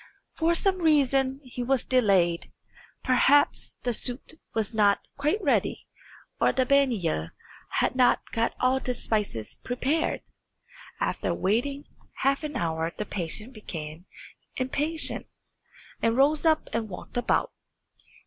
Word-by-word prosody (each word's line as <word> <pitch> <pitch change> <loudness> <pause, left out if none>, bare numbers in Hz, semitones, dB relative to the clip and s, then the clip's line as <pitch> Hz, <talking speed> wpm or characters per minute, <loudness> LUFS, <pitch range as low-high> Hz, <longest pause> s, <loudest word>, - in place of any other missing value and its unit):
For 330 +1 +2
some 380 +2 +2
reason 275 -4 +2
he 250 -1 -7
was 255 0 0
delayed; 195 -9 +2 0.5
perhaps 275 +3 +3
the 245 - +1
tsut 245 +6 -1 0.2
was 220 0 -1
not 205 -2 +4 0.2
quite 305 +9 0
ready, - - +1 0.5
or - - +4
the 260 - +1
baniya 225 - +1 0.4
had - - 0
not 255 -1 +3
got 230 +1 0
all 255 +1 +3
the 250 -1 -2
spices 210 - -2
prepared. 270 +6 0 0.8
After - - -1
waiting 245 +9 0 0.3
half 275 +2 +1
an 300 -1 -4
hour 165 -4 -1
the 210 - -3
prince 180 +1 -2
became 175 -8 -8 0.5
impatient, 295 +5 -1 0.7
and 230 +1 +2
rose 295 +4 +4
up 315 -1 +2
and 225 -1 -2
walked 180 - -9
about. 245 - +1
250 Hz, 125 wpm, -27 LUFS, 210-280 Hz, 0.8 s, not